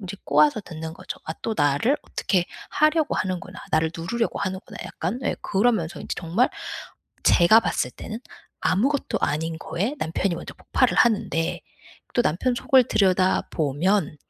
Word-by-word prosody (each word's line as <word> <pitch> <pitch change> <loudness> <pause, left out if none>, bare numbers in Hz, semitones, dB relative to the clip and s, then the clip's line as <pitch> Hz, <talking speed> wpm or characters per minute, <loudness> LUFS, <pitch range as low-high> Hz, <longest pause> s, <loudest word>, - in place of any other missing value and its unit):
인제 195 0 -7
꼬아서 150 +6 +4
듣는 160 -4 -7
거죠. - - -8
'아 160 - -3
또 225 - -1
나를 145 - +2
어떻게 185 -4 0 0.3
하려고 305 0 +2
하는구나. 185 -2 -3
나를 160 0 +2
누르려고 230 +8 -2
하는구나.' 190 -1 -4
약간 185 +10 -3
예 - - 0
그러면서 200 -5 0
인제 - - -4
정말 180 +10 +1 0.7
제가 185 +6 +6
봤을 - - -1
때는 220 +1 -7 0.4
아무것도 265 +10 +1
아닌 160 +2 -1
거에 205 - -2
남편이 175 0 -1
먼저 170 - -7
폭발을 - - +1
하는데 190 -8 +2 0.5
또 240 - +3
남편 240 +8 +1
속을 260 -1 +4
들여다보면 185 -3 +1
185 Hz, 330 characters per minute, -24 LUFS, 165-225 Hz, 0.7 s, 제가